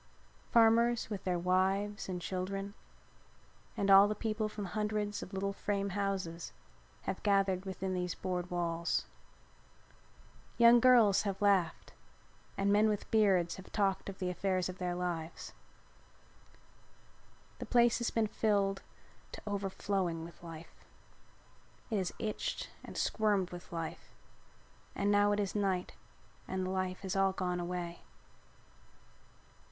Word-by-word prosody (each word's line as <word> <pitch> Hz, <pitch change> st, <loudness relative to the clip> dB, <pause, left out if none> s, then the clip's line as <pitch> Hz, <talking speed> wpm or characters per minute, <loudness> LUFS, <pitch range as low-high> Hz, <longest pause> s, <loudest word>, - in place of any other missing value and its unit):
Farmers 230 Hz, 0 st, +4 dB
with 200 Hz, -3 st, -5 dB
their 180 Hz, -1 st, +1 dB
wives 190 Hz, +3 st, 0 dB
and 180 Hz, -1 st, -3 dB
children 195 Hz, +2 st, -4 dB, 1.0 s
and 200 Hz, -2 st, +2 dB
all 195 Hz, +1 st, +9 dB
the 210 Hz, -, -2 dB
people 215 Hz, -1 st, -2 dB
from 210 Hz, -1 st, -6 dB
the 195 Hz, -, -5 dB
hundreds 210 Hz, -1 st, -2 dB
of -, -, -8 dB
little 200 Hz, 0 st, -2 dB
frame 200 Hz, 0 st, -2 dB
houses 190 Hz, -4 st, -3 dB, 0.5 s
have 190 Hz, -, -4 dB
gathered 195 Hz, -2 st, +2 dB
within 190 Hz, 0 st, -3 dB
these 180 Hz, -1 st, -2 dB
board 180 Hz, -1 st, -3 dB
walls. 170 Hz, -1 st, -1 dB, 1.5 s
Young 235 Hz, 0 st, +8 dB
girls 230 Hz, -5 st, +6 dB
have 195 Hz, -2 st, -3 dB
laughed 195 Hz, -5 st, +1 dB, 0.6 s
and 200 Hz, +1 st, +2 dB
men 215 Hz, +1 st, +4 dB
with 210 Hz, -1 st, -3 dB
beards 195 Hz, -6 st, +3 dB
have 190 Hz, -, -12 dB
talked 195 Hz, -2 st, 0 dB
of 195 Hz, -, -8 dB
the 180 Hz, -1 st, -2 dB
affairs 185 Hz, -1 st, 0 dB
of 185 Hz, 0 st, -7 dB
their 180 Hz, -1 st, -2 dB
lives. 175 Hz, -2 st, -4 dB, 2.1 s
The -, -, -6 dB
place 240 Hz, -1 st, +4 dB
has 235 Hz, -, 0 dB
been 225 Hz, -1 st, +1 dB
filled 200 Hz, -2 st, +1 dB, 0.5 s
to -, -, -7 dB
overflowing 195 Hz, -4 st, -2 dB
with 170 Hz, -, -13 dB
life. 165 Hz, -1 st, -10 dB, 1.2 s
It 215 Hz, -, +1 dB
has 185 Hz, -2 st, -1 dB
itched 215 Hz, -1 st, -3 dB
and -, -, -9 dB
squirmed 205 Hz, -4 st, +1 dB
with 175 Hz, 0 st, -9 dB
life 165 Hz, -1 st, -6 dB, 0.8 s
and 200 Hz, +1 st, +1 dB
now 205 Hz, 0 st, +4 dB
it 205 Hz, -, +1 dB
is 200 Hz, -2 st, -1 dB
night 190 Hz, -3 st, -1 dB, 0.5 s
and 185 Hz, 0 st, -2 dB
the 185 Hz, -, -2 dB
life 185 Hz, -1 st, -2 dB
has 190 Hz, -1 st, -3 dB
all 195 Hz, 0 st, +3 dB
gone 180 Hz, -1 st, -2 dB
away. 175 Hz, -1 st, -4 dB
195 Hz, 135 wpm, -33 LUFS, 180-205 Hz, 2.1 s, all